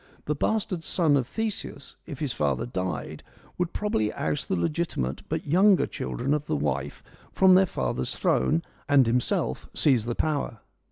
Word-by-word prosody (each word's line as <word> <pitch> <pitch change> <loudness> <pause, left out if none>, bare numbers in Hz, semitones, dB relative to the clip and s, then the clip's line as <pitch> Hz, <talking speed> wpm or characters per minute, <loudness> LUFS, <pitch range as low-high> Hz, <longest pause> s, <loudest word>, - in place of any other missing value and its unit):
The 150 - 0
bastard 185 +1 -1
son 160 -5 +2
of 130 -4 +1
Theseus, 210 -5 -5
if 145 -5 -6
his 145 -5 -1
father 70 -3 0
died, 95 -6 -4 0.4
would 175 -1 0
probably 110 - 0
oust 145 0 -2
the 190 - +1
legitimate 155 - -2
but - - -2
younger 190 +5 +4
children 130 0 -2
of 150 0 -2
the - - 0
wife 70 -1 -2 0.3
from 190 -1 +5
their 190 +1 +6
father's 65 - -2
throne 160 - +2 0.3
and 140 -3 +6
himself 115 - 0
seize 130 -7 +3
the 120 0 -2
power. 145 -8 -1
140 Hz, 160 wpm, -26 LUFS, 105-170 Hz, 0.4 s, their